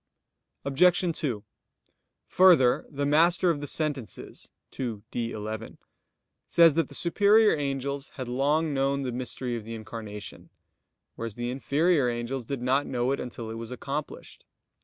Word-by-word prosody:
Obj. 175 +4 +3
2: 120 -9 -2 0.8
Further, 165 -10 +5
the 145 -1 -2
Master 170 +4 +4
of 145 -3 -3
the 145 - -4
Sentences 145 -6 -4 0.3
(ii, 115 -6 -3
D, 115 -1 -2
11) 110 +1 -6 0.7
says 165 -2 +6
that 165 +2 +1
the - - -8
superior 205 +4 +4
angels 140 -1 -3
had 130 -3 -5
long 145 +5 +1
known 135 0 0
the 125 - -2
Mystery 125 0 -3
of 115 - -5
the 115 +1 -7
Incarnation, 110 -2 -8 0.7
whereas 115 -2 -5
the 120 0 -3
inferior 140 +1 +2
angels 120 +1 -3
did 135 0 -4
not 135 +3 +2
know 125 0 0
it 140 - -1
until 120 -2 -6
it 115 - -6
was 115 -1 -7
accomplished. 140 +4 -6
135 Hz, 145 wpm, -27 LUFS, 120-150 Hz, 0.8 s, says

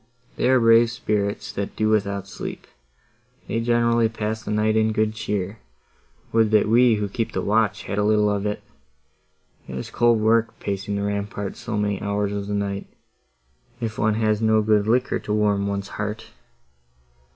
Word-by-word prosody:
They - - +1
are 130 -1 +5
brave 115 0 +5
spirits, 105 -3 -2
that 100 0 -4
do 110 0 +1
without 100 -2 0
sleep—they 65 - -9
generally 115 -1 +2
pass 110 0 -3
the - - -8
night 105 +1 +1
in 110 0 +2
good 110 0 +1
cheer; 105 -1 -3 0.7
would 110 -1 +3
that 105 -1 +3
we, 120 +1 +5
who 105 -1 -2
keep 115 +3 -3
the - - -1
watch, 105 -2 +1
had 100 - -3
a - - +2
little 105 0 +3
of 100 0 -1
it! 105 - -4 1.0
It 65 - -6
is 65 - -6
cold 120 -1 +3
work, 110 +1 +2
pacing 100 0 -3
the 100 - -2
ramparts 100 -1 -3
so 120 -3 -4
many 105 -1 -1
hours 100 0 -1
of 100 -1 -4
the 105 - -2
night, 100 -1 -3 0.9
if 115 -2 -4
one 110 0 +2
has 110 -1 +1
no 110 -1 +3
good 105 -1 +2
liquor 125 +3 +1
to 105 - -4
warm 105 -1 +1
one's 100 0 -3
heart." 105 +1 -5
105 Hz, 175 wpm, -23 LUFS, 100-110 Hz, 1.0 s, are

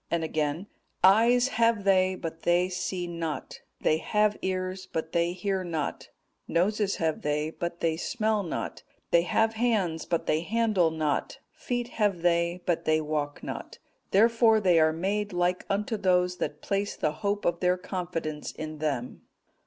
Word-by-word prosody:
And 170 -1 0
again, 155 +2 -1 0.4
'Eyes 235 +6 +5
have 230 -4 +2
they, 190 -1 +3
but 165 -2 -6
they 175 +1 +2
see 180 0 -3
not; 165 -5 -5 0.2
they 155 - +3
have 210 +4 +1
ears, 185 0 -3
but 160 0 -3
they 170 0 +1
hear 190 +1 -2
not; 160 -4 -4 0.4
noses 200 +3 +1
have 160 -2 -1
they, 150 +1 -1
but 170 +1 -5
they 160 -1 +1
smell 215 +2 0
not; 175 - -4 0.3
they 170 - +6
have 225 +6 +1
hands, 215 -8 0
but 170 - 0
they 155 - +2
handle 210 -3 +2
not; 155 -2 -1
feet 245 -1 -3
have 205 -7 0
they, 170 0 +1
but 175 -2 0
they 155 0 +3
walk 150 -1 -3
not. - - -6 0.3
Therefore 225 +2 +5
they 180 -5 +4
are 155 0 +4
made 200 +5 -2
like 180 +1 0
unto 210 +3 -1
those 180 -2 +2
that 150 0 -4
place 200 +1 -1
the 155 - 0
hope 200 +6 -2
of 170 0 +1
their 180 0 +2
confidence 170 -5 -4
in 155 -1 -7
them. 140 -5 -3
180 Hz, 160 wpm, -28 LUFS, 160-205 Hz, 0.4 s, they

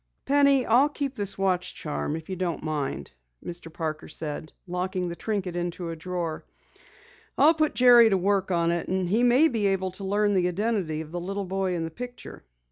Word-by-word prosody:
"Penny, 280 -2 +4
I'll 255 +6 +4
keep 285 -2 -3
this 200 -5 -3
watch 185 -2 0
charm, 150 0 -3
if 160 -1 -7
you 190 - -4
don't 175 -4 -3
mind," 145 - -3 0.3
Mr. 170 -1 -6
Parker 155 -1 -4
said, 155 0 -5
locking 180 0 -2
the 170 - -5
trinket 195 -3 -3
into 175 0 -3
a - - -5
drawer. 170 -1 -4 0.9
"I'll 310 +3 +6
put 310 -1 0
Jerry 245 -2 +7
to 195 - +2
work 195 +1 +1
on 170 -2 +2
it 170 0 -2
and 185 0 -1
he 215 +7 +2
may 250 +6 +5
be 225 -8 0
able 190 -1 0
to 185 +2 -8
learn 205 +1 +1
the 180 -2 +2
identity 180 -4 -1
of 155 -1 -10
the 175 - -3
little 195 +2 -3
boy 190 0 -1
in 165 - -2
the 165 - -5
picture." 245 +6 -9
185 Hz, 200 wpm, -26 LUFS, 170-220 Hz, 0.9 s, Jerry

